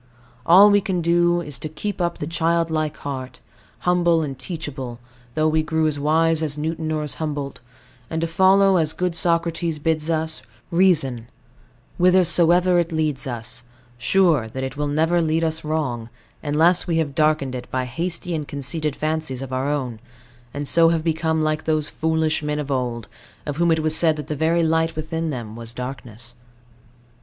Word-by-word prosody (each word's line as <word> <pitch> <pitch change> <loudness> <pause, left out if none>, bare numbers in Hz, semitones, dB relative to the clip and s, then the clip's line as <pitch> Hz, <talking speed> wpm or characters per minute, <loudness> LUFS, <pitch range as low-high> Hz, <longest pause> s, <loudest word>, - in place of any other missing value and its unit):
All 195 +5 +8
we 205 0 +4
can 185 -4 -2
do 175 +1 +3
is, 150 -5 -5
to 155 - -5
keep 185 +6 -4
up 170 -1 -1
the - - -4
childlike 165 -1 0
heart, 130 -2 -5 0.4
humble 175 -2 +3
and 140 -3 -4
teachable, 135 -4 -6 0.4
though 155 0 +2
we 155 0 +2
grew 160 0 0
as 150 -2 0
wise 160 +2 +2
as 150 -2 -2
Newton 160 +1 -2
or 155 -1 -1
as 150 - -2
Humboldt; 145 -3 -3 0.5
and 160 - -2
to - - +1
follow, 190 +3 +4
as 160 -2 +1
good 180 +1 -1
Socrates 170 -1 0
bids 155 +1 -1
us, 160 -1 -1 0.3
Reason 145 -10 +2 0.7
whithersoever 180 0 +4
it 170 0 -1
leads 155 -3 0
us, 120 -1 -5 0.4
sure 160 -3 +3
that 130 +4 -5
it 130 - -4
will 145 0 -2
never 160 +4 +2
lead 160 0 +1
us 160 0 0
wrong, 130 -7 -2 0.3
unless 160 +5 +2
we 165 -2 +1
have 155 -4 0
darkened 150 -3 +1
it 125 -1 -6
by 130 -1 -1
hasty 170 +7 -3
and 150 -3 -3
conceited 145 +1 -2
fancies 155 -4 -2
of 130 -1 -7
our 130 +2 -1
own, 130 -6 -2 0.5
and 145 +1 -5
so 165 +2 +5
have 165 -1 0
become 160 -1 0
like 155 0 -1
those 155 -1 0
foolish 160 -1 0
men 150 0 -2
of 145 -1 -4
old, 120 -5 -2 0.4
of 145 -1 -4
whom 170 0 +2
it 160 -1 +2
was 155 0 0
said 160 -1 +3
that 150 -2 -6
the 150 - -3
very 165 +3 +2
light 160 0 +1
within 160 +1 -3
them 115 -6 -5
was 115 0 -8
darkness. 120 -2 -5
155 Hz, 180 wpm, -22 LUFS, 145-165 Hz, 0.7 s, All